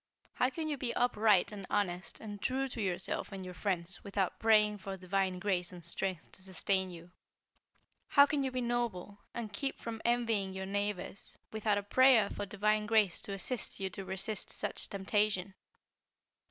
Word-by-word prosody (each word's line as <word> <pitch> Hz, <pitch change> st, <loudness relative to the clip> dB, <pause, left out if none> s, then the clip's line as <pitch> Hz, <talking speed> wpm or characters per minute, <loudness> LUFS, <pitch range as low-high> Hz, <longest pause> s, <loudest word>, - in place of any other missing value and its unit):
How 250 Hz, -, +2 dB
can 315 Hz, +4 st, -4 dB
you 295 Hz, -2 st, -1 dB
be 245 Hz, -2 st, -2 dB
upright, 215 Hz, -6 st, +3 dB
and 200 Hz, -3 st, -7 dB
honest, 185 Hz, -3 st, -1 dB
and 205 Hz, -2 st, -7 dB
true 265 Hz, +1 st, 0 dB
to 235 Hz, -, -4 dB
yourselves 185 Hz, -3 st, -1 dB
and 190 Hz, -1 st, -6 dB
your 180 Hz, -, -7 dB
friends 185 Hz, -2 st, -2 dB
without 195 Hz, -2 st, -1 dB
praying 210 Hz, -2 st, +4 dB
for 195 Hz, 0 st, -6 dB
divine 185 Hz, 0 st, 0 dB
grace 180 Hz, -2 st, 0 dB
and 175 Hz, -3 st, -10 dB
strength 180 Hz, 0 st, -3 dB
to -, -, -11 dB
sustain 190 Hz, 0 st, 0 dB
you? 170 Hz, 0 st, -11 dB, 1.0 s
How 280 Hz, -1 st, +7 dB
can 285 Hz, -1 st, 0 dB
you 265 Hz, -, 0 dB
be 255 Hz, 0 st, -2 dB
noble, 235 Hz, -5 st, -2 dB, 0.2 s
and 220 Hz, -3 st, -4 dB
keep 270 Hz, +7 st, -2 dB
from 225 Hz, -1 st, -5 dB
envying 230 Hz, -5 st, +1 dB
your 190 Hz, 0 st, -4 dB
neighbors, 200 Hz, 0 st, -3 dB
without 215 Hz, -1 st, +1 dB
a 205 Hz, -, -1 dB
prayer 245 Hz, -1 st, +5 dB
for 205 Hz, -, -4 dB
divine 210 Hz, +1 st, +1 dB
grace 210 Hz, -4 st, +3 dB
to 200 Hz, -, -4 dB
assist 210 Hz, +4 st, -1 dB
you 190 Hz, -1 st, -2 dB
to 195 Hz, +2 st, -6 dB
resist 190 Hz, +2 st, -1 dB
such 205 Hz, -, 0 dB
temptation?" 200 Hz, -1 st, 0 dB
205 Hz, 175 wpm, -33 LUFS, 190-225 Hz, 1.0 s, How